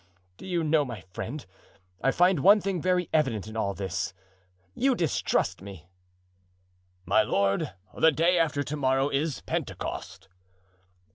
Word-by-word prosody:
"Do - - -10
you 175 -3 0
know, 155 -1 +3
my 120 -6 -7
friend, 140 +5 -5 0.6
I - - +4
find 180 +3 +3
one 200 +8 +7
thing 195 -3 -2
very 180 0 +1
evident 130 -10 +1
in 110 0 -9
all 100 -3 -1
this, 95 -2 -3 0.6
you 265 0 +2
distrust 165 - 0
me." 95 -4 -11 1.2
"My 100 +5 +4
lord, 100 -2 0 0.2
the 160 - +5
day 170 +4 +2
after 150 -3 +1
to 145 +2 -4
morrow 135 -1 +1
is 145 +1 -1
Pentecost." 95 -2 -5
145 Hz, 140 wpm, -27 LUFS, 110-170 Hz, 1.2 s, one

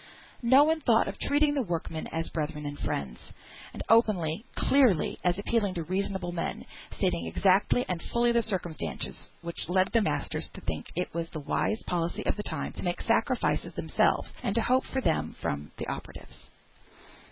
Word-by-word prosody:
No 260 +4 +7
one 315 +1 +2
thought 230 -4 +4
of - - -5
treating 290 +1 +3
the 285 - +1
workmen 165 -5 -3
as 165 0 -3
brethren 150 -1 -3
and 145 0 -4
friends, 65 -3 -3 0.5
and - - -6
openly, 210 -4 +3
clearly, 255 - +3
as 180 0 +2
appealing 205 -2 0
to 170 - -2
reasonable 190 +1 -1
men, 170 -1 -3 0.3
stating 85 -1 0
the - - -3
exact 190 - +3
and 180 -9 -1
full 235 0 +3
circumstances 185 -8 -4
which 170 -1 -2
led 185 +1 +3
the 230 - +5
masters 145 -7 -1
to - - -9
think 80 -1 -4
it 180 +2 -2
was 165 0 -3
the 155 - -6
wise 155 +9 -1
policy 170 -1 -2
of - - +1
the 210 - -3
time - - -4
to - - -7
make 175 -1 -1
sacrifices - - +1
themselves, - - +1
and 195 - -1
to 230 - +3
hope 255 +2 +2
for 265 - -2
them 165 - 0
from 70 +1 -3
the - - -4
operatives. - - -8
185 Hz, 175 wpm, -29 LUFS, 160-230 Hz, 0.5 s, No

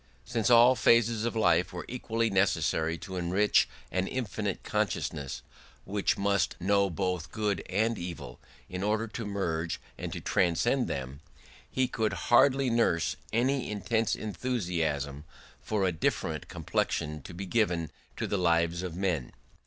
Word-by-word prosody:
Since 115 -3 0
all 120 +1 +8
phases 115 -1 +3
of 120 - -2
life 90 -5 +3
were 90 -1 -6
equally 115 -2 -1
necessary 85 -4 +1
to 95 +2 -7
enrich 90 +4 +3 0.2
an 95 +1 0
infinite 105 -5 -3
consciousness, 70 -4 -2 0.4
which 100 0 0
must 100 -4 +1
know 100 +2 +2
both 90 -1 -2
good 105 -5 -1
and 110 +4 +1
evil 85 -8 -7 0.3
in 90 0 -5
order 105 +2 +1
to 115 +1 -5
merge 85 -5 -2 0.2
and - - -4
to - - -4
transcend 105 +10 +1
them, 65 +1 -4 0.5
he 130 -1 +1
could 110 -3 -1 0.2
hardly 135 +1 +5
nurse 100 -9 +2 0.2
any 130 +3 +1
intense 110 +2 0
enthusiasm 85 - -2 0.4
for 105 -3 0
a 90 - +2
different 80 - -1
complexion 75 0 -2
to 85 - -10
be 95 +3 -5
given 90 -7 0 0.3
to - - -1
the 100 - -1
lives 85 0 +2
of 90 -3 -5
men. 90 -9 -1
100 Hz, 145 wpm, -29 LUFS, 85-115 Hz, 0.5 s, all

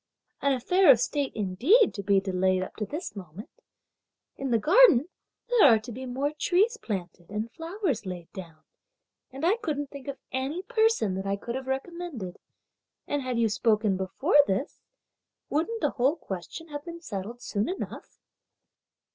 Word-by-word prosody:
an 280 - +2
affair 360 +9 +3
of 255 -4 +8
state 280 +3 -1
indeed 240 - +3
to 200 - -5
be 200 0 +3
delayed 185 -1 +1
up - - -9
to 210 - -4
this 310 -2 -6
moment! 195 - -11 0.7
In 270 - -4
the 235 - +3
garden, 325 - +6 0.4
there 485 -3 +4
are 230 -4 +7
to 220 +3 -8
be 260 +3 -7
more 275 +4 -1
trees 385 +9 +2
planted 180 -4 -5
and 215 +2 -4
flowers 330 - -3
laid 180 -3 -7
down, 165 -4 -10 0.7
and 270 +4 -4
I 395 +6 +3
couldn't 290 - -3
think 280 -2 -10
of 280 -1 -4
any 275 +8 -2
person 445 - +2
that 190 +1 -4
I 195 - +1
could 235 +4 -6
have 265 +1 -5
recommended, 270 - -5 0.7
and 290 -1 -1
had 255 -2 -2
you 230 -1 +3
spoken 215 -1 +2
before 190 - +1
this, 195 +9 -2 0.7
wouldn't 445 +10 -1
the - - +1
whole 265 +4 +2
question 295 - -7
have 290 -1 -6
been 340 0 -8
settled 230 - -6
soon 205 +1 -1
enough?" 375 - -6
260 Hz, 165 wpm, -27 LUFS, 200-325 Hz, 0.7 s, of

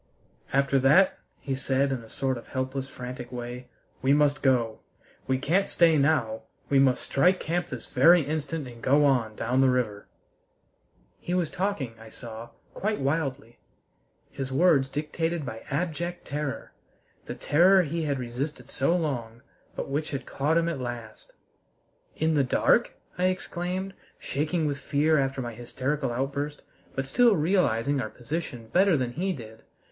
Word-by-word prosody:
"After 140 0 +3
that," 150 +9 +4 0.2
he 135 - -3
said 135 +1 +1
in 130 - -1
a 115 - -14
sort 130 +2 -1
of 120 - -9
helpless, 130 +1 -3
frantic 125 -1 -7
way, 125 0 -6 0.3
"we 135 +1 +3
must 145 0 +3
go! 120 -5 +2 0.5
We 130 - +2
can't 170 +9 +1
stay 165 -2 +4
now; 140 -7 +2 0.3
we 140 - +5
must 130 -2 +3
strike 180 +7 +3
camp 175 +2 -1
this 125 -7 -6
very 165 +6 +5
instant 150 0 -3
and 120 -1 -11
go 145 +2 +4
on 120 -6 +2
down 125 +5 +1
the 135 - +5
river." 115 -5 -1 1.1
He 175 - -3
was 175 -4 0
talking, 185 - -2
I 110 0 -12
saw, 115 0 -9 0.2
quite 210 +1 -1
wildly, 140 -4 -2 0.7
his 135 -1 -5
words 140 -2 +4
dictated 160 +2 -2
by 110 -3 -6
abject 175 +3 -3
terror 145 0 -4 0.5
the - - -4
terror 185 +5 +5
he 165 +1 -2
had 140 -2 0
resisted 125 +2 -5
so 155 +7 +1
long, 120 -7 -3 0.3
but - - -4
which 145 +3 -2
had 140 -2 -4
caught 150 +4 0
him 170 0 +2
at 165 -5 -2
last. 120 - -7 0.8
"In 160 0 +1
the 145 -2 +3
dark?" 125 - +3 0.3
I 180 - +3
exclaimed, 185 +1 -2 0.2
shaking 155 +3 -1
with 140 -2 -1
fear 150 +2 +2
after 135 -1 -1
my 120 -2 -5
hysterical 130 +3 -2
outburst, 140 +4 -3 0.3
but 135 - -1
still 230 - +4
realizing 145 - +2
our 110 - -4
position 125 -2 -5
better 185 - +4
than 125 -2 -1
he 185 +9 -1
did. 110 -8 -9
140 Hz, 160 wpm, -27 LUFS, 125-165 Hz, 1.1 s, we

